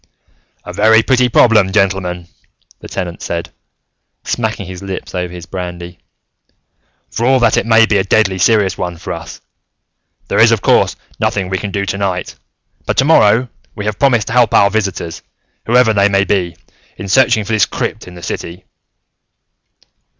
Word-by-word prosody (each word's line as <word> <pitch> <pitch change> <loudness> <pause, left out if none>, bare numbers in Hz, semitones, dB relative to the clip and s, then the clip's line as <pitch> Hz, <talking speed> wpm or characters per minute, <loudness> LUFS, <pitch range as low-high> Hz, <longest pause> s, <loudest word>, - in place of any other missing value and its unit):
"A - - -8
very 110 +1 +4
pretty 125 -1 +2
problem, 110 -5 +4
gentlemen," 95 -3 -1 0.5
the - - -11
Tenant 90 -2 -5
said, 85 0 -4 0.7
smacking 110 -4 -3
his 90 0 -9
lips 95 -1 -7
over 90 -1 -3
his 90 -1 -9
brandy, 90 -1 -7 1.1
"for 115 - -3
all 130 0 +4
that 120 - +3
it - - 0
may 115 0 +5
be 110 -2 +1
a - - +1
deadly 95 -1 +1
serious 105 0 +2
one 90 -1 -4
for 85 - -6
us. - - -9 0.9
There - - 0
is, - - +6
of - - 0
course, - - +3 0.2
nothing 95 -2 -1
we 95 0 -2
can 105 - -5
do 100 0 -2
tonight. 100 -2 -3 0.5
But, - - -1
tomorrow, 125 -4 +4 0.3
we 105 - -6
have 105 -1 -3
promised 120 -6 +2
to - - -4
help 120 -3 +3
our 100 0 +4
visitors, 95 -6 -3 0.5
whoever 120 -1 +4
they 100 -1 +3
may 100 0 +2
be, 95 -4 -1 0.4
in 100 - -7
searching 120 0 +3
for 110 - -3
this 110 - +3
crypt - - -4
in 90 - -11
the 85 - -12
city. 90 +2 -6
100 Hz, 165 wpm, -15 LUFS, 90-110 Hz, 1.1 s, is